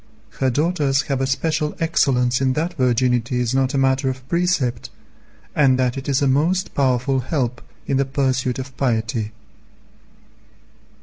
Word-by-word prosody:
Her 130 - +2
daughters 145 0 +1
have 135 -2 -2
a 135 - 0
special 155 +3 -1
excellence 130 -6 +1
in 130 -1 +2
that 165 +5 -2
virginity 125 -2 +1
is 120 0 0
not 135 0 +1
a - - +2
matter 135 0 +2
of 130 0 -6
precept, 170 -9 0 0.7
and 135 -4 +4
that 125 -1 0
it 135 +1 -5
is 140 +1 +1
a - - +3
most 160 +8 +1
powerful 130 0 +1
help 125 -2 -2 0.2
in 135 - 0
the 140 - +2
pursuit 130 -2 0
of 130 0 -7
piety. 110 -4 -1
130 Hz, 150 wpm, -21 LUFS, 125-145 Hz, 0.7 s, and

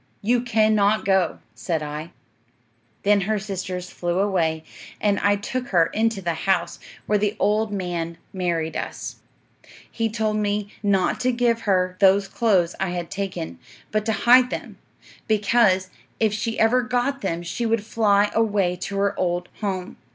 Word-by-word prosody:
"You 240 +3 +2
cannot 215 -3 +2
go," 190 -3 +1
said 165 -4 -2
I. 150 +2 -6 0.9
"'Then 205 0 +4
her 215 +3 0
sisters 185 -2 -5
flew 175 0 -2
away, 170 -5 +1 0.4
and 205 -1 +1
I 205 0 +3
took 245 +5 -4
her 170 -3 +4
into 220 -2 0
the 170 -1 0
house, 170 0 -1 0.3
where 210 0 +2
the 210 +1 0
old 215 +1 +1
man 175 -4 -3 0.2
married 170 -4 -1
us. - - -5 0.7
He 225 -1 -1
told 215 -1 -1
me 205 0 -1
not 195 -3 +1
to 255 0 +2
give 235 -1 +1
her 185 -1 +1
those 195 0 +5
clothes 190 -5 +2
I 190 - 0
had 175 -1 -4
taken, 135 - -4 0.3
but 215 0 0
to 220 - +2
hide 250 +1 +7
them; - - -6 0.5
because 205 -3 +3 0.3
if 220 -2 +2
she 225 +1 -2
ever 235 +3 +4
got 250 +3 -1
them 170 -4 -2
she 230 +7 -2
would 225 -2 0
fly 205 -2 +2
away 205 -5 +1
to 195 +2 -5
her 200 0 +1
old 175 0 -1
home. 190 -3 -3
200 Hz, 160 wpm, -23 LUFS, 180-220 Hz, 0.9 s, hide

